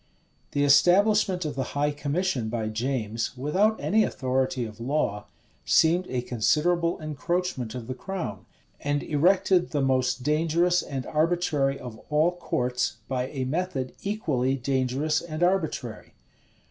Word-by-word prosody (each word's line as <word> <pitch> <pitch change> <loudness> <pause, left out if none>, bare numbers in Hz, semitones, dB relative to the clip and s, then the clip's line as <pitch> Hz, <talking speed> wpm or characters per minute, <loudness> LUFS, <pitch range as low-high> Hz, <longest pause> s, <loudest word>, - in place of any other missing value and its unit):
The 145 - +2
establishment 185 +4 +4
of 150 - -2
the 135 - -3 0.2
high 145 +1 +2
commission 145 -4 -1
by 110 -1 -2
James, 115 0 -2
without 190 - +1
any 220 +1 +3
authority 130 - -1
of 110 -1 -10
law, 115 -5 -1 0.4
seemed 175 +3 +3
a 125 -1 -2
considerable 170 +9 +1
encroachment 155 -5 -2
of 125 -3 -6
the 130 - -4
crown, 165 - -6 0.3
and 145 0 -1
erected 180 +3 +3
the 145 -3 -1
most 130 -1 +1
dangerous 165 +4 +2
and 135 -2 -5
arbitrary 155 -4 +1
of 120 -4 -9
all 155 +3 +3
courts, 125 -9 -1
by 130 -1 -1
a 130 -2 -4
method 140 -3 -2
equally 145 - 0
dangerous 135 +4 0
and 170 0 -4
arbitrary. 160 - -1
145 Hz, 135 wpm, -26 LUFS, 125-175 Hz, 0.4 s, establishment